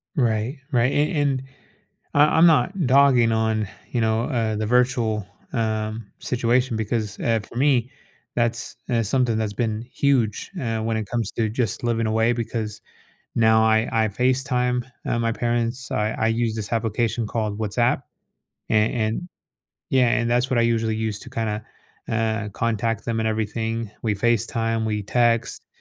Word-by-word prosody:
Right, 120 0 0
right, 125 +1 +3
and 150 +4 +1
and 140 -3 +1 0.7
I 145 +1 +7
I'm 170 - +8
not 165 +2 +3
dogging 130 -3 +5
on, 110 -2 0 0.2
you 120 - 0
know, 110 0 +1
uh, 115 -6 -1
the 110 - -1
virtual, 120 -3 +1 0.3
um, 110 -2 -2
situation 125 0 +1
because, 110 -1 -2
eh, 115 -1 +2
for 110 - -13
me, 130 -2 +2 0.5
that's, 120 0 -1
eh, 120 -3 +2
something 115 +1 +1
that's 110 -2 -1
been 110 0 -2
huge, 125 -7 +1
eh, 115 -5 -1
when 110 0 -1
it 110 -2 -3
comes 115 -3 -2
to 110 -2 0
just 115 0 -2
living 115 -1 +1
away 115 +2 +2
because 115 -2 -3 0.5
now 110 -1 +4
I 110 +1 +3
I 110 -1 +2
FaceTime, 125 +1 0 0.2
uh, 115 - 0
my 115 -1 +1
parents 120 +1 -1
I 105 +1 0
I 110 - 0
use 115 0 0
this 110 0 -5
application 115 0 0
called 105 -1 -2
WhatsApp. 115 +3 +1 0.7
And 105 0 +3
and 115 +9 -2 0.6
yeah, 130 -2 +4
and 120 0 +1
that's 125 +2 +1
what 125 - +2
I - - +4
usually 115 -1 +1
use 110 -2 -2
to - - -10
kinda, 105 -2 -2 0.4
eh, 110 -1 -1
contact 115 +1 -1
them 115 -1 -1
and 110 - +1
everything 110 0 -2
we 110 -2 +1
FaceTime, 115 +1 0
we 105 -1 -1
text. 115 +2 +1
115 Hz, 160 wpm, -23 LUFS, 110-120 Hz, 0.7 s, I'm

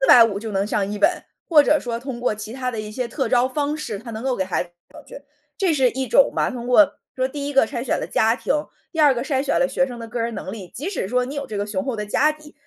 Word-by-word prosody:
450 230 -6 +6
就 220 -1 -5
能 195 0 0
上 205 -2 -1
一 210 - -4
本。 350 +7 +2 0.2
或 300 -4 +6
者 300 +1 +3
说 235 -1 -3
通 245 -1 -6
过 245 - +1
其 215 +1 -7
他 255 0 -3
的 225 -3 -4
一 210 0 -7
些 250 +1 -3
特 265 +4 -2
招 250 0 +3
方 290 +2 -1
式， 230 -9 -5
它 230 +2 -9
能 220 - -6
够 260 -1 0
给 190 - 0
孩 185 - -1
子 175 - -14
弄 175 - -44
上 175 - -69 0.6
去， 295 0 -46
这 370 -4 +2
是 265 -4 +3
一 265 0 -3
种 - - +5
嘛， - - +1
通 245 -2 -6
过 280 +4 +5 0.2
说 255 - 0
第 285 +1 -5
一 290 - -4
个 270 - +5
筛 235 +2 -5
选 - - +1
了 - - -3
家 225 +1 +2
庭。 - - -1 0.4
第 325 - -5
二 295 -3 +6
个 240 - -3
筛 270 -2 0
选 280 - +1
了 270 - +3
学 270 0 +1
生 245 - -7
的 230 - -6
个 240 +1 -5
人 230 0 -2
能 190 - -6
力， 195 -4 -8
即 300 +9 -3
使 365 - -3
说 250 +4 +1
你 275 +3 -6
有 280 -1 -4
这 210 - -5
个 200 - -1
雄 205 -1 -3
厚 265 -3 -2
的 210 -1 -4
家 295 +9 +3
底， 305 0 -16
250 Hz, 325 characters per minute, -22 LUFS, 220-285 Hz, 0.6 s, 450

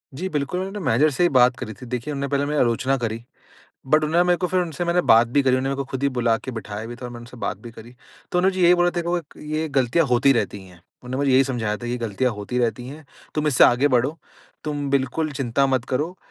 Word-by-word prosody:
जी, 180 +7 -3
बिल्कुल, 150 +2 -2
मैंने 195 +2 -4
मैनेजर 150 - +3
से 145 - 0
ही 175 - +4
बात 125 0 +5
करी 110 - -6
थी 110 - -12
देखिए 125 +3 -4
उन्होंने 140 0 -3
पहले 140 0 +1
मेरी 150 0 -1
आलोचना 125 +3 +1
करी, 115 -2 -4 0.6
बट 155 +3 +3
उन्होंने 165 +3 +3
मेरे 180 0 +3
को 180 - 0
फिर 185 +1 +1
उनसे 175 -1 -3
मैंने 170 +1 +2
बात 115 +1 +7
भी 140 +5 +1
करी 135 - +2
उन्होंने 130 +1 -1
मेरे 140 - -2
को 140 - -3
खुद 130 0 -4
ही 140 - +3
बुला 115 -2 +2
के - - -7
बिठाया 105 +1 -7
भी 120 +1 -8
था 125 - -10
और - - -8
मैंने 120 - -9
उनसे 120 +1 -13
बात 105 - -3
भी 120 - -8
करी। 115 +1 -13 0.4
तो 180 - +2
उन्होंने 190 +1 +2
मुझे 185 - 0
यही 175 - +7
बोला 175 0 +2
था - - -19
देखो 170 +1 -1
एक 160 - -13
ये 155 +1 -3
गलतियाँ 135 +5 +2
होती 125 +2 +4
रहती 110 -5 -2
हैं। 90 -1 -16 0.3
उन्होंने 125 +1 -5
मुझे 135 - +2
यही 130 +1 +5
समझाया 115 -5 -2
था 120 +2 -4
गलतियाँ 125 +5 0
होती 105 +4 -4
रहती 120 0 -1
है, 150 +3 -10 0.3
तुम 155 0 -1
इससे 135 - +5
आगे 125 +4 +4
बढ़ो, 135 +4 +1 0.5
तुम 145 -2 -3
बिल्कुल 140 +3 0
चिंता 135 0 0
मत 130 -3 0
करो 150 +8 -2
135 Hz, 265 wpm, -22 LUFS, 120-155 Hz, 0.6 s, बात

